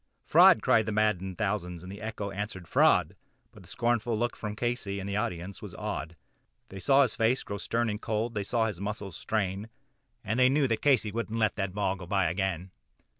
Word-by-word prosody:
"Fraud!" -, -, +7 dB
yelled 110 Hz, -1 st, +4 dB
the -, -, -1 dB
maddened 100 Hz, -3 st, 0 dB
thousands, 90 Hz, -5 st, -2 dB
and 90 Hz, -, -8 dB
the 100 Hz, +2 st, -9 dB
echo 105 Hz, -2 st, -4 dB
answered 100 Hz, -3 st, -5 dB
"Fraud," -, -, +3 dB, 0.4 s
But -, -, -15 dB
one -, -, -16 dB
scornful 120 Hz, -1 st, 0 dB
look 120 Hz, +2 st, -1 dB
from 105 Hz, -1 st, -5 dB
Casey 120 Hz, -4 st, -2 dB
and 95 Hz, -, -5 dB
the 100 Hz, -, -3 dB
audience 90 Hz, -2 st, -3 dB
was -, -, -9 dB
awed; 85 Hz, -, -4 dB, 0.5 s
They 95 Hz, -, -8 dB
saw 135 Hz, +9 st, +5 dB
his 125 Hz, -, -1 dB
face 115 Hz, +4 st, +1 dB
grow 100 Hz, -, -5 dB
stern 115 Hz, +3 st, -1 dB
and 105 Hz, 0 st, -3 dB
cold; 110 Hz, +2 st, -2 dB
they 105 Hz, -, -2 dB
saw 115 Hz, +3 st, 0 dB
his 105 Hz, -5 st, -4 dB
muscles 100 Hz, -3 st, -5 dB
strain, 100 Hz, +1 st, -2 dB, 0.5 s
And 110 Hz, +4 st, -1 dB
they 125 Hz, 0 st, +6 dB
knew 140 Hz, 0 st, +2 dB
that 115 Hz, -2 st, -1 dB
Casey 125 Hz, -7 st, +3 dB
would 115 Hz, +2 st, -3 dB
not 115 Hz, -, -3 dB
let 110 Hz, -2 st, +1 dB
that 95 Hz, -2 st, -2 dB
ball 100 Hz, -2 st, 0 dB
go 90 Hz, -1 st, -9 dB
by 95 Hz, 0 st, +1 dB
again. 95 Hz, -1 st, -2 dB
105 Hz, 215 wpm, -29 LUFS, 95-115 Hz, 0.5 s, Fraud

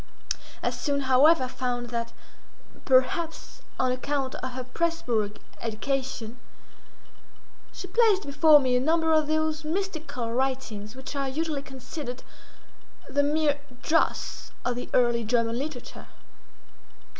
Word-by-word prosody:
I -, -, +1 dB
soon, 285 Hz, -2 st, -1 dB
however, 265 Hz, +2 st, +5 dB
found 245 Hz, -1 st, -3 dB
that, 235 Hz, -1 st, -2 dB, 0.7 s
perhaps 320 Hz, +6 st, +1 dB, 0.2 s
on 255 Hz, -1 st, +2 dB
account 265 Hz, +1 st, -1 dB
of 255 Hz, -1 st, -5 dB
her 255 Hz, 0 st, -4 dB
Presburg 245 Hz, -8 st, -1 dB, 0.2 s
education, 240 Hz, 0 st, -3 dB, 1.3 s
she -, -, -7 dB
placed 415 Hz, 0 st, +3 dB
before 300 Hz, +2 st, +6 dB
me 255 Hz, -2 st, +1 dB
a -, -, +4 dB
number 320 Hz, +4 st, +2 dB
of 310 Hz, -1 st, +3 dB
those 315 Hz, 0 st, 0 dB
mystical 315 Hz, -9 st, -3 dB
writings 245 Hz, -5 st, -2 dB
which 265 Hz, +2 st, -8 dB
are 275 Hz, -1 st, -1 dB
usually 305 Hz, +1 st, -2 dB
considered 265 Hz, -1 st, -7 dB, 0.8 s
the 285 Hz, -, +2 dB
mere 290 Hz, 0 st, +2 dB, 0.2 s
dross 325 Hz, +1 st, 0 dB, 0.2 s
of 245 Hz, -, +1 dB
the 245 Hz, -, -5 dB
early 240 Hz, -2 st, +3 dB
German 230 Hz, +1 st, +1 dB
literature. 305 Hz, +3 st, -6 dB
270 Hz, 120 wpm, -27 LUFS, 245-310 Hz, 1.3 s, before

